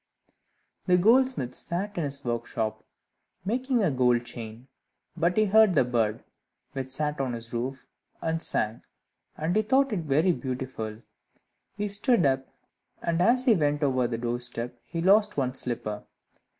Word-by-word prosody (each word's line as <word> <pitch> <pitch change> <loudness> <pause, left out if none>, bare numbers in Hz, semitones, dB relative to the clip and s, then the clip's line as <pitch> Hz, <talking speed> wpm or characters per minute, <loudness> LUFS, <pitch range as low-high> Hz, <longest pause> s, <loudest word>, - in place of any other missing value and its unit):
The 180 -1 +5
goldsmith 230 - +3
sat 200 +4 -4
in 170 - -1
his 140 -1 -5
workshop, 115 -2 -2 0.6
making 250 +2 +1
a 175 - +2
gold 125 -2 +2
chain, 115 +1 -8 0.5
but 170 +3 +1
he 215 - +5
heard 210 -2 +5
the - - +5
bird, 115 -3 0 0.5
which 135 -2 -5
sat 150 +2 -1
on 130 -2 -1
his 115 0 -7
roof, 130 +3 -3 0.3
and 165 0 -1
sang, 110 -5 -2 0.6
and 160 +3 -1
he 215 - +4
thought 265 +3 +2
it 200 - 0
very 155 +3 +2
beautiful. 125 -5 -5 0.7
He 210 0 -1
stood 205 - +2
up, 135 -1 +1 0.6
and 170 0 0
as 250 +7 +3
he 245 - +6
went 150 -4 +1
over 130 -3 +2
the 115 -1 -3
door 120 +1 -2
step 120 0 -5
he 165 -1 -3
lost 205 +1 +4
one 130 -2 0
slipper. 110 -5 -3
140 Hz, 155 wpm, -27 LUFS, 120-195 Hz, 0.7 s, he